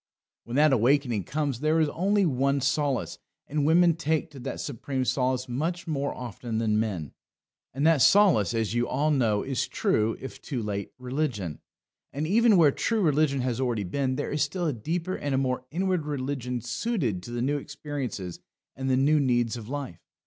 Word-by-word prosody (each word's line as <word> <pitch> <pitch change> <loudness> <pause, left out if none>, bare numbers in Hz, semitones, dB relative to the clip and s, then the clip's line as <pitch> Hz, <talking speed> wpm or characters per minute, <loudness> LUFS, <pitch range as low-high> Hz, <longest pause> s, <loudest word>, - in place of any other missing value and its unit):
When 120 - -5
that 150 0 +5
awakening 125 - +2
comes 140 - -2
there 155 +3 +2
is 155 - +3
only 200 +5 +1
one 140 -1 +1
solace, 140 0 -1 0.3
and 145 0 0
women 170 +1 +5
take 160 -1 -1
to 140 - -11
that - - -5
supreme 130 0 -3
solace 130 0 0
much 160 +9 -2
more 140 -4 -1
often 120 -1 -5
than 110 -1 +1
men. 95 - -3 0.6
And 140 +4 -1
that 160 -4 +4
solace, 175 - +5
as 110 -1 0
you 120 0 +1
all 145 +4 +1
know, 115 -7 +2
is 135 -2 -1
true, 110 +1 0
if 135 - -9
too 125 -6 -4
late, 100 -1 -4
religion. 125 - -3 0.5
And 145 +3 -3
even 215 +4 +4
where 155 -4 +6
true 225 +9 0
religion 150 -4 +2
has 125 0 -1
already 120 -5 0
been, 130 +8 -1
there - - -3
is 150 - -1
still 175 +5 -1
a 155 - +1
deeper 165 - -3
and 145 -2 -2
a - - +2
more 130 -1 -1
inward 180 -1 -1
religion 130 -3 -3
suited 135 - -2
to 90 - -10
the 120 0 -2
new 145 +3 +1
experiences 130 - -5 0.4
and 135 +1 -3
the 130 - +3
new 150 +3 +4
needs 120 -4 +1
of 115 -1 -8
life. 135 - -5
135 Hz, 185 wpm, -27 LUFS, 120-155 Hz, 0.6 s, where